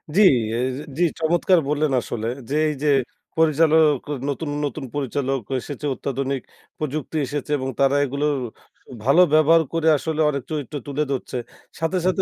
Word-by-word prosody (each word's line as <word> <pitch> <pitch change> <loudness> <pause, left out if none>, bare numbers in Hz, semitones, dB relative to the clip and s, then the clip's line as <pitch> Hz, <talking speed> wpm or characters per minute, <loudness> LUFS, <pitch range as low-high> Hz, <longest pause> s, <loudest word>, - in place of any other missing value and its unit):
জি 205 - +5 0.4
এর 125 - 0 0.3
জি, 175 - +2 0.2
চমৎকার 175 +3 +3
বললেন 150 0 +1
আসলে 115 -1 -4 0.2
যে, 145 - -1
এইযে 150 0 -3 0.5
পরিচালক 160 0 +4 0.2
ক - - -20 0.2
নতুন, 145 +2 -3 0.2
নতুন 145 -1 -4
পরিচালক 135 -1 -1 0.2
এসেছে, 145 +3 -7
অত্যাধুনিক 135 0 -3 0.4
প্রযুক্তি 155 +1 -3
এসেছে। 145 +2 -4
এবং 130 -1 -3
তারা 140 0 +4
এগুলো 140 +2 -2 0.8
ভালো 140 +8 +5
ব্যবহার 155 +2 +6
করে 165 -1 0
আসলে 160 +2 -2
অনেক 140 -3 -2
চরিত্র 150 -1 -4
তুলে 145 +1 -1
ধরছে। 130 -1 -3 0.4
সাথে, 165 +3 0
সাথে 185 +1 +2
150 Hz, 145 wpm, -22 LUFS, 135-160 Hz, 0.8 s, ব্যবহার